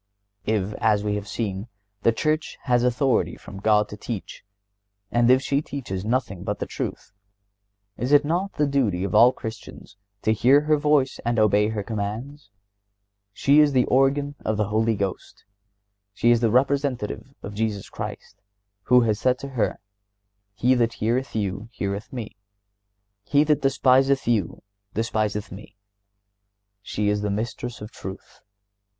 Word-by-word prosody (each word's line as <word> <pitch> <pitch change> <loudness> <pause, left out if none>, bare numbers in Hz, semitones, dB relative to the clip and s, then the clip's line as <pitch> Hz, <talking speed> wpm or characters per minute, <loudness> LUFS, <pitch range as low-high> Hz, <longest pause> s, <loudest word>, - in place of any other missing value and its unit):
If, 105 -2 0
as 105 -2 +2
we 105 -1 -1
have 105 0 -4
seen, 100 -1 -3 0.3
the 115 - +4
Church 155 +6 -1
has 125 -2 +2
authority 125 +1 +1
from 95 - -11
God 105 0 +3
to - - -7
teach, 110 -3 -6 0.7
and 120 0 +3
if 130 +1 +5
she 140 +2 +1
teaches 120 -11 -5
nothing 110 -5 -1
but 105 0 -2
the - - -3
truth, - - -5 0.9
is 125 +3 -2
it 145 0 +6
not 180 +6 -1
the 150 - +1
duty 125 -11 0
of 100 - -3
all 120 +2 +7
Christians 110 -4 -9 0.3
to 110 - +3
hear 130 +6 +5
her 155 +1 +3
voice 150 -3 +2
and 120 0 0
obey 105 -1 +4
her 110 -2 -3
commands? 110 +5 -5 0.8
She 140 +8 +4
is 150 -2 +5
the 125 -2 +4
organ 140 +2 +2
of 110 -1 -1
the 105 -2 0
Holy 110 +1 +1
Ghost. 100 -2 -5 0.7
She 120 - +3
is 120 - +4
the 115 -1 +2
Representative 135 0 0
of 100 - -6
Jesus 105 -2 -2
Christ, - - -8 0.4
who 125 0 +6
has 110 -2 +1
said 130 0 +2
to 140 - -7
her: 125 -5 -1 0.8
"He 125 +4 +3
that 115 -2 +1
heareth 120 +4 -1
you 100 +1 -3
heareth 100 -1 -4
Me; 115 -3 -6 0.9
he 145 +6 +3
that 150 -1 +2
despiseth 135 0 +3
you 110 -8 0 0.3
despiseth 110 -2 -1
Me." 100 +1 -11 1.0
She 105 +1 -2
is 105 0 +1
the 105 - -1
Mistress 115 +3 -4
of 105 - -8
truth. 95 0 -9
115 Hz, 155 wpm, -24 LUFS, 105-135 Hz, 1.0 s, all